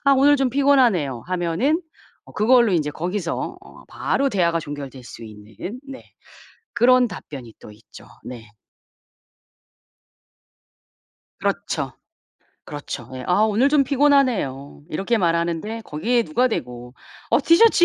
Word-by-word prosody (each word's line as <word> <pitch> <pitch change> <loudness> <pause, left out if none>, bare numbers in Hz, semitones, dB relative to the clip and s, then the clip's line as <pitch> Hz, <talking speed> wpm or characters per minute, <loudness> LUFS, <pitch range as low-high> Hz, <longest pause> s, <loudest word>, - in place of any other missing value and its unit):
"아 275 - +5
오늘 280 +2 +5
좀 265 -2 0
피곤하네요." 240 - +2
하면은 185 - 0 0.4
어 - - -16
그걸로 235 0 +4
인제 155 -4 +1
거기서 175 +2 -3
어 - - -16
바로 275 0 0
대화가 170 -6 +1
종결될 140 -4 -8
수 115 - -10
있는 110 - -9
네. 270 -1 -9 0.7
그런 250 +1 +4
답변이 135 - -9
또 - - -12
있죠. 105 +1 -16 0.2
네. 115 -3 -9 2.9
그렇죠. - - -2 0.7
그렇죠. 140 -5 -7
예. 130 0 -7
"아 180 +3 +2
오늘 220 +5 +3
좀 290 -1 +4
피곤하네요." 255 - +1
이렇게 195 +9 -1
말하는데 170 +5 -1
거기에 230 +9 0
누가 255 0 +1
대고 125 - -5 0.4
"어 - - +4
티셔츠 345 +2 +6
190 Hz, 260 characters per minute, -22 LUFS, -, 2.9 s, 티셔츠